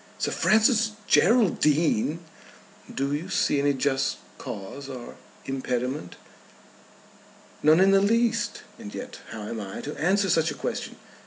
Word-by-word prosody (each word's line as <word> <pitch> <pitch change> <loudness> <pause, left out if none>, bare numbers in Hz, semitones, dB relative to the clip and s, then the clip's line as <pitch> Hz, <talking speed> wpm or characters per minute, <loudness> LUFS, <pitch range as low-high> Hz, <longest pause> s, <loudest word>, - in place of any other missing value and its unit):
"Sir - - -1
Francis 220 0 +3
Geraldine!" 165 - +3 0.7
"Do 140 +1 -2
you 160 +6 -3
see 145 - +1
any 145 0 +2
just 135 0 0 0.2
cause 135 +8 -7
or 125 -3 -8 0.3
impediment?" 130 -5 -3 1.5
"None 155 +3 +5
in 190 +1 +5
the 195 0 +5
least. 230 +2 +1 0.2
And 210 -3 -9
yet 250 0 -7
how 110 -2 -7
am 110 +2 -5
I 95 -1 -7
to 150 - -6
answer 195 +4 +2
such 160 0 +3
a - - -5
question? - - -4
155 Hz, 135 wpm, -26 LUFS, 135-200 Hz, 1.5 s, None